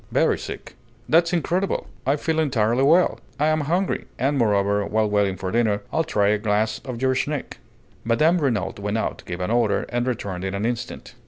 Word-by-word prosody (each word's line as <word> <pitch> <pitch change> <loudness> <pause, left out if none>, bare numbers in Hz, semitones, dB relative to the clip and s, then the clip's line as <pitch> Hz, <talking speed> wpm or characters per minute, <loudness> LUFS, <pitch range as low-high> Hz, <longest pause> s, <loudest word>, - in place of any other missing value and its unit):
"Very - - +2
sick." - - -8 0.3
"That's 170 +1 +4
incredible! 180 +2 0 0.2
I 140 - +4
feel 160 +2 -1
entirely 125 -5 +1
well; 165 +6 +4 0.2
I'm 155 +1 +2
hungry; 175 +6 -1
and 140 +3 +1
moreover, 100 -4 +2
while 110 +1 +1
waiting 100 -2 +1
for 95 0 -4
dinner 110 -3 +1
I'll 160 - +2
try 105 -11 +1
a 105 0 +2
glass 105 0 0
of 125 -3 -5
your 130 0 +3
schnick." 145 +2 -3 0.4
Mme. 150 +10 +3
Renault 125 -9 -1
went 105 +2 -2
out, - - -2
gave 90 +1 -5
an 90 - -1
order, 120 0 +2
and 120 +1 -1
returned 100 -7 -3
in 95 0 -2
an 100 +2 -2
instant. 120 0 -4
120 Hz, 185 wpm, -23 LUFS, 105-150 Hz, 0.4 s, That's